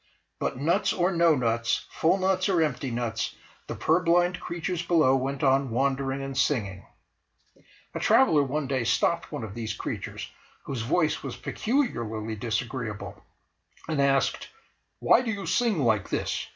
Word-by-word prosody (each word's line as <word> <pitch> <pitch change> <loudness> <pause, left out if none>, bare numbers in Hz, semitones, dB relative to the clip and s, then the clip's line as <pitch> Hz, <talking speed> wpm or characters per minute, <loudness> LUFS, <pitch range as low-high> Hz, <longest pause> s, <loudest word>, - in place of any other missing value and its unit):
But - - -2
nuts 150 +6 +1
or 180 +1 +1
no 170 -3 +4
nuts, 115 -2 0
full 165 +4 +2
nuts 190 0 +1
or 180 -3 +2
empty 140 -4 0
nuts, 115 -2 -3 0.3
the - - -4
purblind 175 +2 +2
creatures 175 0 -3
below 165 -6 +3
went 135 +1 -2
on 135 0 +3
wandering 135 +2 -1
and 135 0 -5
singing. 100 -10 0 1.1
A - - -3
traveller 150 -2 +4
one 140 +2 -1
day 130 -2 -1
stopped 170 +8 +1
one 145 -5 -5
of 105 -3 -6
these 110 -1 -4
creatures - - -5 0.4
whose 130 -4 -4
voice 155 +7 +1
was - - -6
peculiarly 115 - -2
disagreeable, 115 0 -4 0.6
and 155 -3 0
asked 135 0 +1 0.5
"Why - - +4
do 245 - -4
you 200 -3 -3
sing 225 - +1
like 110 -4 +1
this? - - -2
140 Hz, 150 wpm, -27 LUFS, 120-170 Hz, 1.1 s, no